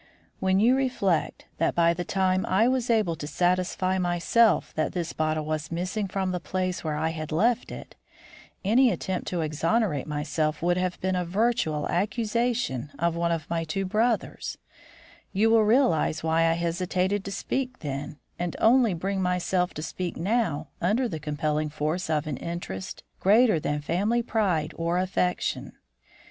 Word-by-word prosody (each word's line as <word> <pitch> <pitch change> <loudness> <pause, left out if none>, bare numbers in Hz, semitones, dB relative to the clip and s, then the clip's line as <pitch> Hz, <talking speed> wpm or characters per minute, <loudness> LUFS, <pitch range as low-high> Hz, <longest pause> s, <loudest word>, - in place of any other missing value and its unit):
"When 190 0 +2
you 240 +5 +5
reflect 245 - 0
that 165 - +1
by 170 0 +4
the 175 +1 -3
time 185 0 +1
I 200 +5 +3
was 255 -1 0
able 215 -8 +2
to 145 - -6
satisfy 185 +2 +1
myself 180 +5 +2
that 155 - -1
this 170 -2 -3
bottle 155 -1 -1
was 155 +1 -3
missing 185 +5 -2
from 190 0 -2
the 180 - -2
place 185 +1 -2
where 155 -2 -2
I 160 +2 0
had 155 -1 -5
left 230 +9 +1
it, - - -9 0.7
any 245 +6 +5
attempt 185 -1 -3
to 175 -2 -1
exonerate 160 - 0
myself 150 +1 -1
would 175 0 +3
have 180 0 -1
been 185 0 0
a 180 - 0
virtual 180 -5 0
accusation 215 - -1
of 170 +2 0
one 170 0 0
of 165 -2 -2
my 165 -1 -1
two 180 +5 -2
brothers, 220 +4 -1 0.8
you 215 +3 +3
will 225 -1 +5
realise 210 - +2
why 165 0 +3
I - - +3
hesitated 180 +3 -1
to 200 - -4
speak 255 +6 -3
then, 145 0 -5 0.2
and 175 -1 -2
only 230 -4 +4
bring 190 +3 -2
myself 180 0 0
to 155 - -5
speak 180 +1 -4
now 170 -6 0
under 220 +8 +2
the 160 -8 -5
compelling 150 +1 -1
force 155 +4 -2
of 155 -1 +1
an 150 -4 -3
interest 95 - -6 0.2
greater 215 -1 +4
than 150 0 -2
family 205 +10 0
pride 180 -10 0
or 170 +1 0
affection. 180 -1 -1
180 Hz, 165 wpm, -26 LUFS, 160-205 Hz, 0.8 s, you